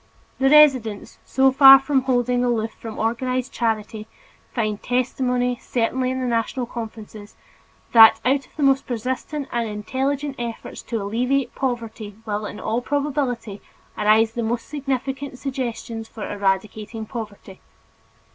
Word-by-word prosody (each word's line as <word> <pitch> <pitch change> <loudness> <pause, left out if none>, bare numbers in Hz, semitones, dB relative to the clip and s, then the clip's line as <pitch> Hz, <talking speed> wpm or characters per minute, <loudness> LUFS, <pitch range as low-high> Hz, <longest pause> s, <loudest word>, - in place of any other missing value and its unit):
The 270 0 +4
residents, 265 -8 +4
so 265 0 +3
far 270 0 +10
from 270 0 +1
holding 245 -1 +1
aloof 225 -2 0
from 225 -1 -9
organized 255 +3 -1
charity, 220 -2 -2 0.4
find 215 -3 -2
testimony, 250 0 0
certainly 255 +2 -1
in 260 0 -2
the 255 - -2
National 240 +1 -1
Conferences, 220 -3 -9 0.6
that 225 -1 +8
out 270 +1 +1
of - - -30
the 300 - -2
most 270 0 +3
persistent 260 +4 -3
and 235 -2 -1
intelligent 270 +7 -3
efforts 235 -1 -6
to 230 - -4
alleviate 245 +6 -1
poverty 230 -5 -4
will 210 -1 -3
in 210 - -8
all 225 +3 -1
probability 265 -7 -2 0.3
arise 215 +1 +3
the 235 - -4
most 230 +1 -2
significant 270 -1 -4
suggestions 235 -4 -5
for 220 - -7
eradicating 205 +2 -2
poverty. 210 -4 -8
240 Hz, 135 wpm, -22 LUFS, 220-265 Hz, 0.6 s, far